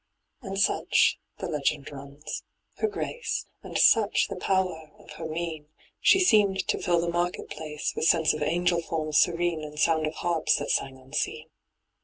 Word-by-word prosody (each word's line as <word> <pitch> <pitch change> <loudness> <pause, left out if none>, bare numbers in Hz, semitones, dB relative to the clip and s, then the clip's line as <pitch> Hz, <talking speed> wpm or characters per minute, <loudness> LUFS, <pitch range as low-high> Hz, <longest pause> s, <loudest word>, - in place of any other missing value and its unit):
And 195 0 -5
such, - - +3 0.2
the - - -4
legend 145 -1 -1
runs, 140 +2 -7 0.4
her 440 - +1
grace, 475 +3 -3 0.2
And - - -5
such 215 -3 +4
the 195 - -4
power 180 -4 -1
of - - -16
her 160 - -6
mien, 160 -2 -4 0.3
She 385 - +5
seemed 205 - +3
to - - 0
fill 175 -1 +2
the 170 - -1
market 175 +1 -2
place 150 -1 -4
With - - -1
sense 165 -1 +4
of 155 - -5
angel 170 +2 +1
forms 155 -2 0
serene 175 -1 +1
^ - - -8
And 150 0 -8
sound 160 -1 +2
of 155 - -5
harps 170 -2 +1
that - - -2
sang 135 -1 -1
unseen. 150 +4 -4
165 Hz, 175 wpm, -27 LUFS, 155-180 Hz, 0.4 s, She